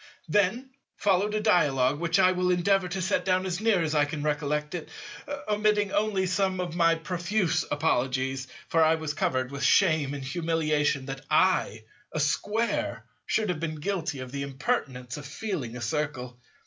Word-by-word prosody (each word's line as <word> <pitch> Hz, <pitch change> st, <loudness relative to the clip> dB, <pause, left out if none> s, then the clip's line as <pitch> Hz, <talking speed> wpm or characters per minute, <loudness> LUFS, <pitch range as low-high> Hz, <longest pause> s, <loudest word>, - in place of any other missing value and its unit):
Then 210 Hz, +6 st, +1 dB, 0.2 s
followed 205 Hz, +1 st, +1 dB
a -, -, +1 dB
dialogue, 145 Hz, -, +3 dB
which 170 Hz, 0 st, +1 dB
I 185 Hz, -1 st, +5 dB
will 180 Hz, 0 st, 0 dB
endeavour 185 Hz, +1 st, +2 dB
to 185 Hz, +1 st, -3 dB
set 185 Hz, -, +1 dB
down 185 Hz, 0 st, +1 dB
as 185 Hz, +1 st, -2 dB
near 215 Hz, -6 st, +3 dB
as 155 Hz, -1 st, -1 dB
I 150 Hz, -1 st, +3 dB
can 145 Hz, 0 st, -5 dB
recollect 150 Hz, 0 st, -1 dB
it, 170 Hz, -3 st, -5 dB, 0.6 s
omitting 210 Hz, -1 st, +2 dB
only 205 Hz, -2 st, +1 dB
some 190 Hz, 0 st, 0 dB
of 175 Hz, -2 st, -3 dB
my 165 Hz, -1 st, +4 dB
profuse 175 Hz, 0 st, 0 dB
apologies—for 135 Hz, +1 st, 0 dB
I 160 Hz, +1 st, +4 dB
was 160 Hz, -2 st, -3 dB
covered 130 Hz, -3 st, -1 dB
with 140 Hz, 0 st, -6 dB
shame 155 Hz, -4 st, +3 dB
and 140 Hz, -, -6 dB
humiliation 150 Hz, -2 st, 0 dB
that 135 Hz, 0 st, -6 dB
I, 155 Hz, -, +2 dB, 0.3 s
a 155 Hz, -, -3 dB
Square, 205 Hz, +10 st, -1 dB, 0.2 s
should 215 Hz, -2 st, +1 dB
have 175 Hz, -4 st, -1 dB
been 160 Hz, -1 st, -3 dB
guilty 165 Hz, -3 st, -3 dB
of 130 Hz, -1 st, -7 dB
the 140 Hz, 0 st, -4 dB
impertinence 135 Hz, -, -3 dB
of 145 Hz, -, -8 dB
feeling 140 Hz, -, -4 dB
a -, -, -8 dB
Circle. 125 Hz, -1 st, -3 dB
160 Hz, 170 wpm, -27 LUFS, 145-190 Hz, 0.6 s, I